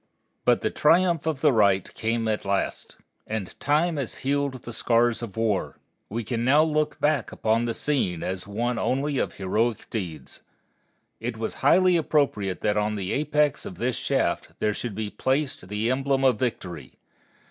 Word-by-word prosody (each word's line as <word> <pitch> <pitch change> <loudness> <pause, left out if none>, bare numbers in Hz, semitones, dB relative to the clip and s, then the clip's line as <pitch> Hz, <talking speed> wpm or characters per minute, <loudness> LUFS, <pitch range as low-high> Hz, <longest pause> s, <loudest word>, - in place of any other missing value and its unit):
But - - +4
the - - 0
triumph 170 0 +3
of 150 -4 -1
the 150 - +5
right 100 -4 +3
came 115 0 -1
at 110 -1 -1
last. 100 0 -2 0.3
And 110 -4 -4
time 155 +3 +1
has 135 -5 -3
healed 140 -1 0
the 120 - -7
scars 120 0 +2
of 115 -3 -7
war. 110 -3 0 0.3
We 115 +3 -3
can 115 +1 -2
now 145 +5 +5
look 155 -1 0
back 145 -6 +1
upon 115 +2 +1
the 115 -1 -2
scene 110 - -1
as 95 +1 -4
one 115 +3 -1
only 135 +2 0
of - - -2
heroic 110 +4 -1
deeds. 90 -8 -6 0.8
It 115 0 -4
was 110 0 -3
highly 180 +5 +5
appropriate 140 - 0
that 105 0 +1
on 105 0 0
the 95 -2 -3
apex 150 0 +1
of 205 -3 -7
this 125 -4 -1
shaft - - -1
there 105 - 0
should 110 -1 -4
be 105 -1 -3
placed 135 -7 -1
the 105 +4 -1
emblem 135 +1 +1
of 125 -5 +3
Victory. 90 - -4
120 Hz, 170 wpm, -25 LUFS, 105-145 Hz, 0.8 s, the